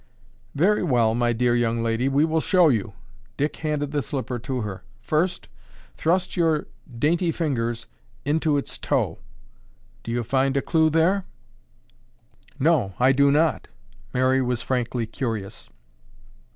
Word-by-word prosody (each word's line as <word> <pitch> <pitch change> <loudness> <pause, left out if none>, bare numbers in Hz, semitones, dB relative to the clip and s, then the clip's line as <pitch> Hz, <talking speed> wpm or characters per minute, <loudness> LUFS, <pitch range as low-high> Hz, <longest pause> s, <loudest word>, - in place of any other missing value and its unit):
"Very 195 +9 +3
well, 120 -9 +2
my 120 +1 +1
dear 120 +1 +1
young 115 -1 0
lady, 115 +3 0
we 140 +3 +3
will 160 0 0
show 180 -2 +4
you." 110 -5 -1 0.4
Dick 150 +1 -1
handed 150 -2 -2
the 145 -1 0
slipper 130 -1 -4
to 125 +2 -3
her. 95 -4 -6 0.2
"First, 160 +10 -1 0.5
thrust 180 +3 0
your 160 -3 +1 0.3
dainty 165 +6 +1
fingers 120 -8 -2 0.4
into 150 0 +1
its 140 - -4
toe. - - -1 0.8
Do - - -9
you 120 +1 -1
find 135 +3 +1
a - - +2
clue 160 -2 +3
there?" 175 +5 +2 1.3
"No, 130 - +2
I 130 +2 +5
do 140 +1 +4
not." 155 +3 +1 0.4
Mary 130 +1 +2
was 125 -2 -1
frankly 120 -2 -1
curious. 110 - -5
135 Hz, 140 wpm, -24 LUFS, 120-155 Hz, 1.3 s, I